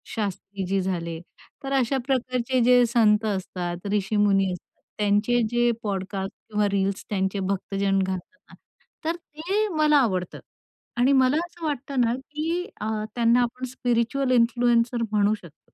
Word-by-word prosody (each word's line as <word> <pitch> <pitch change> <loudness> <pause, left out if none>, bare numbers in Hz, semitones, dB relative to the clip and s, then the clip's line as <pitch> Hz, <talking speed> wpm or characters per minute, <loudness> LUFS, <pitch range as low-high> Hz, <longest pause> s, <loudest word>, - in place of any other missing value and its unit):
शास्त्रीजी 195 -2 -2
झाले 170 -3 -3 0.4
तर 275 0 -3
अशा 270 0 +2
प्रकारचे 255 -1 0
जे 245 0 +6
संत 220 -2 +3
असतात, 180 -2 -3
ऋषीमुनी 200 -2 +2
असतात 180 - -9 0.3
त्यांचे 210 +4 +2
जे 240 0 +2
पॉडकास्ट 195 -1 -3 0.2
किंवा 210 -1 +1
रील्स 195 0 -1
त्यांचे 190 -1 -1
भक्तजन 195 0 0
घालतात 190 +7 -4
ना, - - -14 0.5
तर 330 - 0
ते 345 +6 -2
मला 300 -1 +5
आवडतं. 185 -10 0 0.6
आणि 250 +3 +4
मला 265 +2 +4
असं 345 -1 -10
वाटतं 280 -3 -1
ना 235 0 +2
की 305 +6 -3 0.2
अ, 215 - -2 0.3
त्यांना 235 +1 +4
आपण 250 +2 -2
स्पिरिच्युअल 245 +2 0
इन्फ्लुएन्सर 240 0 +3
म्हणू 210 0 +3
शकतो. 170 -6 -17
230 Hz, 135 wpm, -25 LUFS, 195-255 Hz, 0.6 s, जे